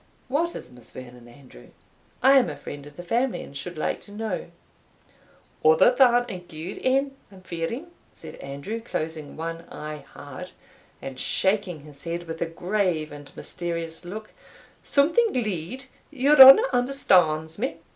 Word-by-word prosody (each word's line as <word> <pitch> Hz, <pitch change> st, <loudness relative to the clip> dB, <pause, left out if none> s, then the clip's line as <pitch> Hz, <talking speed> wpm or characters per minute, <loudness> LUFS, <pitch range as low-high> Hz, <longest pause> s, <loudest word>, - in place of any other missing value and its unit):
"What 330 Hz, +6 st, 0 dB
is 125 Hz, -, -9 dB
Miss 125 Hz, -2 st, -15 dB
Vernon, 125 Hz, -1 st, -11 dB
Andrew? 120 Hz, -, -16 dB, 0.6 s
I 270 Hz, +1 st, +8 dB
am 245 Hz, -, 0 dB
a 145 Hz, -, -7 dB
friend 145 Hz, 0 st, -9 dB
of 145 Hz, -, -15 dB
the 175 Hz, -, -7 dB
family, 240 Hz, +7 st, 0 dB
and 140 Hz, -, -13 dB
should 170 Hz, +4 st, -7 dB
like -, -, -2 dB
to 205 Hz, -, -15 dB
know." 210 Hz, -2 st, -4 dB, 1.2 s
"Other 160 Hz, +10 st, +6 dB
than 245 Hz, -2 st, +5 dB
a 190 Hz, -6 st, -6 dB
gude 175 Hz, +1 st, -8 dB
ane, 270 Hz, +1 st, +1 dB, 0.2 s
I'm 190 Hz, -1 st, -14 dB
fearing," 185 Hz, -, -5 dB, 0.2 s
said -, -, -11 dB
Andrew, 140 Hz, +12 st, -6 dB
closing 160 Hz, -8 st, -5 dB
one 165 Hz, +1 st, -5 dB
eye 150 Hz, -1 st, -7 dB
hard, -, -, -9 dB, 0.5 s
and 130 Hz, -1 st, -7 dB
shaking 190 Hz, -3 st, 0 dB
his 145 Hz, -1 st, -14 dB
head 170 Hz, +1 st, -4 dB
with 165 Hz, -1 st, -7 dB
a 170 Hz, -, 0 dB
grave 175 Hz, -2 st, -1 dB
and 145 Hz, -1 st, -11 dB
mysterious 170 Hz, -1 st, -5 dB
look 215 Hz, +5 st, -8 dB, 0.5 s
"something 335 Hz, +11 st, +3 dB
glee'd 220 Hz, +2 st, -3 dB, 0.2 s
your 285 Hz, 0 st, +5 dB
honour 270 Hz, -, +11 dB
understands 180 Hz, -, +2 dB
me?" 260 Hz, +4 st, -2 dB
175 Hz, 155 wpm, -25 LUFS, 155-245 Hz, 1.2 s, honour